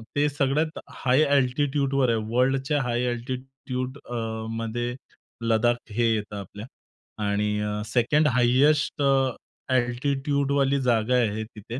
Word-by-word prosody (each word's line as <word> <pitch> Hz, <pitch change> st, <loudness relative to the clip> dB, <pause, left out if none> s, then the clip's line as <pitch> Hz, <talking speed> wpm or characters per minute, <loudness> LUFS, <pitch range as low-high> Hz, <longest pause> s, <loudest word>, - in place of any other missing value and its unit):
ते 145 Hz, +1 st, +3 dB
सगळ्यात 145 Hz, +3 st, 0 dB, 0.2 s
हाय 130 Hz, +3 st, +4 dB, 0.2 s
एल्टिट्यूडवर 135 Hz, 0 st, +1 dB
आहे. 115 Hz, -, +2 dB, 0.2 s
वर्ल्डच्या 135 Hz, +3 st, +2 dB
हाय 120 Hz, 0 st, -1 dB
एल्टिट्यूड 130 Hz, +1 st, -5 dB
अ, 120 Hz, -, -4 dB, 0.3 s
मध्ये 115 Hz, +2 st, -3 dB, 0.5 s
लद्दाख 115 Hz, +1 st, +3 dB, 0.2 s
हे 115 Hz, +1 st, +2 dB
येतं 105 Hz, -1 st, -3 dB
आपल्या, 100 Hz, +2 st, -9 dB, 0.6 s
आणि 105 Hz, 0 st, -1 dB
सेकंड 125 Hz, +7 st, +2 dB
हाइस्ट 135 Hz, +4 st, +3 dB, 0.7 s
एटिट्यूडवाली 140 Hz, +2 st, +1 dB
जागा 120 Hz, -1 st, +2 dB
आहे 110 Hz, -3 st, +1 dB
तिथे. 110 Hz, +2 st, -8 dB
125 Hz, 105 wpm, -25 LUFS, 115-140 Hz, 0.7 s, हाय